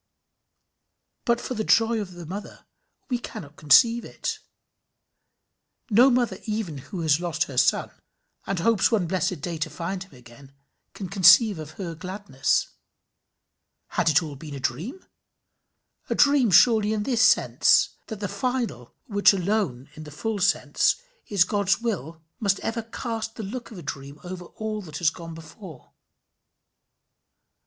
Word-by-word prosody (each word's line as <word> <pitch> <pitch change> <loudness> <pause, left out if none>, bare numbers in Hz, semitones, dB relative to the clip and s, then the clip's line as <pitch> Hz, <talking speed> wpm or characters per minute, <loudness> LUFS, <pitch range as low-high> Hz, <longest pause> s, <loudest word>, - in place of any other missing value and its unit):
But 235 0 +2
for 255 - -5
the 220 -2 -2
joy 225 0 +3
of 185 -3 -7
the 175 -1 -9
mother, 195 +6 -8 0.4
we 245 -3 -1
cannot 150 -10 -9
conceive 230 - +5
it. - - -5 1.5
No 240 +6 +7
mother 240 -6 +1
even 210 -9 -3
who 170 +6 -7
has 155 -1 +3
lost 170 -2 -1
her 135 - -9
son, - - +2 0.6
and 195 - -1
hopes 210 +4 +3
one 210 -6 +2
blessed 185 +2 0
eternal 150 - -10
day 170 -2 -3
to 160 +1 -2
find 170 +5 -5
him 195 -8 -19
again, 125 +3 -16 0.4
can 195 - -5
conceive 195 +2 +6
her 160 +3 -7
gladness. 185 -4 -1 1.2
Had - - +1
it 155 +1 +5 0.2
been 150 -1 -8
all - - -5
a - - -6
dream? 170 - -4 1.0
A - - 0
dream 280 -5 +4
surely 215 +3 +5
in 210 -1 -1
this 240 -1 0
sense, 225 - +4 0.2
that 220 -3 -7
the 205 - -1
final, 240 - -3
which 205 -1 +4
alone, 180 - -1
in 155 0 -10
the 150 - -10
full 210 +8 -3
sense, 195 +1 +2 0.3
is 200 -4 +4
God's 200 0 +1
will, 165 - -4 0.2
must 200 -3 +1
ever 230 +1 -2
cast 225 0 -5
the 220 - -6
look 235 +5 -6
of 220 - -11
a 175 - -9
dream 140 +1 -7
over 180 0 -7
all 215 +3 -5
that 155 -6 -8
has 165 -2 +2
gone 165 -1 -9
before. 160 - -12
190 Hz, 155 wpm, -25 LUFS, 160-220 Hz, 1.5 s, No